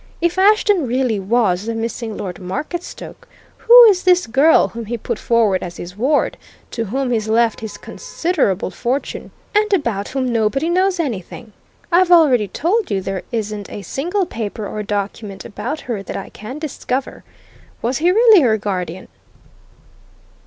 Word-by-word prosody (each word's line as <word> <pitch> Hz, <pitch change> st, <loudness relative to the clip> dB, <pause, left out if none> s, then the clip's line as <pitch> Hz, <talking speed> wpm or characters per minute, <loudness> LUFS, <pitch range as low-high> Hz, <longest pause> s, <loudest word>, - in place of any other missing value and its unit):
If 345 Hz, +2 st, 0 dB
Ashton 405 Hz, -5 st, +3 dB
really 245 Hz, -3 st, 0 dB
was 200 Hz, -2 st, +1 dB
the 230 Hz, -, -2 dB
missing 225 Hz, -1 st, -4 dB
Lord 180 Hz, -3 st, -6 dB
Marketstoke, 295 Hz, -, -6 dB, 0.3 s
who 485 Hz, +1 st, +8 dB
is 405 Hz, -5 st, +5 dB
this 360 Hz, -1 st, +3 dB
girl 275 Hz, +8 st, +4 dB
whom 230 Hz, -1 st, -7 dB
he 235 Hz, +3 st, -4 dB
put -, -, -4 dB
forward 220 Hz, -5 st, +2 dB
as 175 Hz, -1 st, -7 dB
his 175 Hz, +2 st, -8 dB
ward, 270 Hz, +7 st, +1 dB, 0.3 s
to 230 Hz, -, -3 dB
whom 255 Hz, +4 st, -2 dB
he's 220 Hz, -2 st, -1 dB
left 230 Hz, 0 st, +2 dB
his 220 Hz, -2 st, -7 dB
considerable 275 Hz, -, -2 dB
fortune, 255 Hz, +3 st, -3 dB, 0.2 s
and 425 Hz, 0 st, +2 dB
about 235 Hz, -, 0 dB
whom 255 Hz, -2 st, -2 dB
nobody 230 Hz, +9 st, 0 dB
knows 370 Hz, 0 st, +1 dB
anything? 230 Hz, -, -5 dB, 0.4 s
I've 355 Hz, +1 st, +4 dB
already 285 Hz, -, +5 dB
told 370 Hz, -, -1 dB
you 195 Hz, -, 0 dB
there 190 Hz, 0 st, -4 dB
isn't 210 Hz, -3 st, -4 dB
a 205 Hz, -, -7 dB
single 350 Hz, -, -2 dB
paper 220 Hz, -5 st, -5 dB
or 210 Hz, -, -5 dB
document 205 Hz, -1 st, -4 dB
about 235 Hz, +9 st, -5 dB
her 230 Hz, -5 st, -4 dB
that -, -, -6 dB
I -, -, -7 dB
can 225 Hz, +7 st, -9 dB
discover. 275 Hz, -4 st, -4 dB, 0.6 s
Was 245 Hz, +2 st, 0 dB
he 340 Hz, +3 st, +3 dB
really 435 Hz, -1 st, +6 dB
her 225 Hz, -5 st, +3 dB
guardian?" 185 Hz, -4 st, -4 dB
235 Hz, 160 wpm, -19 LUFS, 210-330 Hz, 0.6 s, who